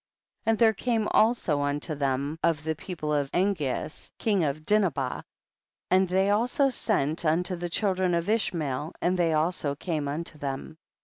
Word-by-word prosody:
16. - - +1
And 225 - +3
there 225 -1 +5
came 225 0 0
also 215 -10 +3
unto 145 +3 -1
them 140 +2 -1
of 160 -3 +1
the 160 0 -1
people 155 -2 -4
of 145 -2 0
Angeas, 175 -7 -1
king 205 -5 +1
of 155 +1 -2
Din 210 +3 +4
habah, 140 -9 -1 0.7
and 185 0 +4
they 190 +2 +2
also 250 +7 +2
sent 170 - 0
unto 175 +3 +1
the 175 0 -4
children 185 -1 +1
of 170 0 -1
Ishmael 160 - -1
and 180 +1 +1
they 170 -3 +2
also 155 -2 0
came 155 -2 -3
unto 155 +1 -4
them. 140 +3 -5
170 Hz, 170 wpm, -27 LUFS, 150-195 Hz, 0.7 s, there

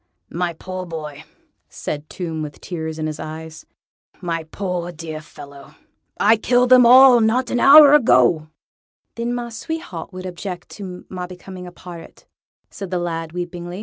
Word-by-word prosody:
"My 175 0 -2
poor 185 +2 -7
boy," 150 -3 -7 0.4
said 150 0 -6
Tomb, 165 -3 -5
with 150 -2 -7
tears 160 -3 -6
in 155 - -3
his 155 -1 -4
eyes, 160 0 -8 0.5
"my 165 -3 -3
poor, 175 0 -4
dear 160 -2 -7
fellow, 140 -1 -13 0.4
I 220 +3 +5
killed 245 +3 +2
them 250 -2 +8
all 255 0 +8
not 235 +3 +1
an 245 - 0
hour 290 +2 +9
ago." 155 - +4 0.7
"Then 235 +1 -3
my 240 -1 -4
sweetheart 230 - -6
would 185 0 -8
object 180 0 -7
to 185 -3 -9
my 180 -1 -6
becoming 180 0 -10
a - - -10
Pirate," 175 -2 -12 0.5
said 195 -2 -7
the 180 - -1
lad, 165 -2 -4
weeping. 175 0 -5
180 Hz, 155 wpm, -20 LUFS, 160-215 Hz, 0.7 s, hour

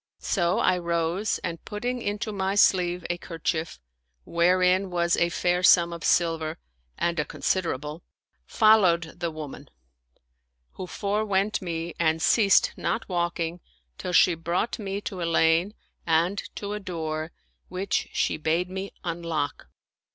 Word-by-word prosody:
So 175 -2 0
I 180 - +2
rose 170 +4 -1
and 170 -2 -4
putting 245 +4 -3
into 205 0 -3
my 195 -1 -1
sleeve 180 -3 +3
a 175 0 -2
kerchief, 165 - -3 0.4
wherein 180 +2 +2
was 175 -1 +1
a 170 - +2
fair 175 0 0
sum 170 -2 +5
of 170 - -8
silver 165 -2 +1 0.4
and 170 -1 0
a - - +2
considerable, 155 -3 -2 0.5
followed 180 -7 +3
the 170 - -1
woman, 150 -3 -8 1.0
who 185 - -7
forewent 205 +1 0
me 170 -2 -4
and 160 -1 +2
ceased 200 +3 +4
not 225 - -2
walking 175 -1 -2 0.4
till 180 - -4
she 180 0 +5
brought 170 +8 -2
me 200 -1 -4
to 190 -3 -6
a 170 - -1
lane 165 +5 +3 0.3
and 170 +4 +2 0.2
to 205 0 -4
a 210 - -3
door, 160 -4 -4 0.4
which 185 +2 -2
she - - 0
bade 165 +4 0
me 190 +1 -4
unlock. 165 - -3
175 Hz, 135 wpm, -26 LUFS, 165-195 Hz, 1.0 s, sum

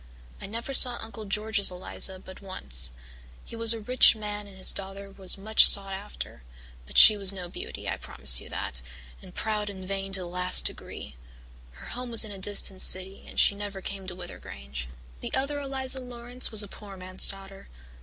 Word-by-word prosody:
I - - -7
never 230 +6 -6
saw 250 -2 +6
Uncle 220 -1 -9
George's 210 +1 0
Eliza 185 +1 -5
but 185 +1 -14
once. 65 - +2 0.5
He - - -10
was 230 0 +2
a 230 - -1
rich 250 +2 +4
man 210 -1 -7
and 195 -1 -15
his 185 - +2
daughter 195 0 -7
was 190 -1 -3
much 215 +3 +5
sought 195 -1 +2
after, 195 - -9 0.5
but - - -6
she 215 - +9
was 200 -2 +2
no 185 -2 -7
beauty, - - -9
I - - -3
promise 60 -2 +4
you - - -12
that, - - -4 0.4
and 185 - -14
proud 210 -1 -3
and 190 -2 -10
vain 195 0 -4
to 190 - +1
the - - -7
last 180 +1 0
degree. - - -8 0.6
Her 65 - -11
home 250 0 -6
was 230 -1 +6
in 215 - -9
a 195 - -10
distant 195 -1 0
city 185 +1 +4
and - - -5
she - - +5
never 200 -1 -7
came 195 0 -8
to 180 - -6
Wyther 175 -1 -10
Grange. 65 -2 -8 0.3
"The - - -5
other 285 +2 -3
Eliza 265 -1 -3
Laurance 245 0 +2
was 215 -1 +3
a - - -9
poor 200 0 -12
man's 185 0 +1
daughter. 195 0 -7
195 Hz, 200 wpm, -26 LUFS, 185-220 Hz, 0.6 s, she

